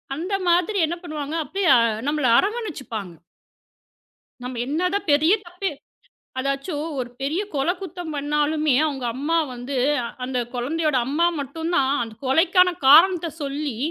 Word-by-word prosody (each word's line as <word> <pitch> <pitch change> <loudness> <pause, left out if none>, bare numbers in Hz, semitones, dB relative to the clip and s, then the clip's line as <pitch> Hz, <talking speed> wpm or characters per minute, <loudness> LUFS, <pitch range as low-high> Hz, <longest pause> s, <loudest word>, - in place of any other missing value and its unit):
அந்த 365 +6 -2
மாதிரி 360 +4 +2
என்ன 340 - -3
பண்ணுவாங்க? 305 -2 -5
அப்படியே 385 +3 -2
அ - - +5 0.3
நம்மள 295 -2 0
அரவணைச்சுப்பாங்க. 300 - -4 1.3
நம்ம 250 -1 -5
என்னதான் 360 +5 -1
பெரிய 315 +6 +4
தப்பே 360 +1 -4 0.7
அதாச்சும் 275 +3 -2 0.2
ஒரு 245 -1 -3
பெரிய 305 +8 -1
கொலைக் 345 +7 0
குத்தம் 355 -3 -6
பண்ணாலுமே 300 0 +1
அவங்க 270 -4 -4
அம்மா 310 +5 0 0.2
வந்து, 250 +3 -5 0.5
அந்தக் 250 -2 -3
குழந்தையோட 300 +3 0
அம்மா 315 +5 +2
மட்டும்தான் 280 -1 -1
அந்தக் 225 +1 -9
கொலைக்கான 360 +5 +4
காரணத்தைச் 330 +2 +5
சொல்லி 280 -3 -3
305 Hz, 125 wpm, -23 LUFS, 275-345 Hz, 1.3 s, அ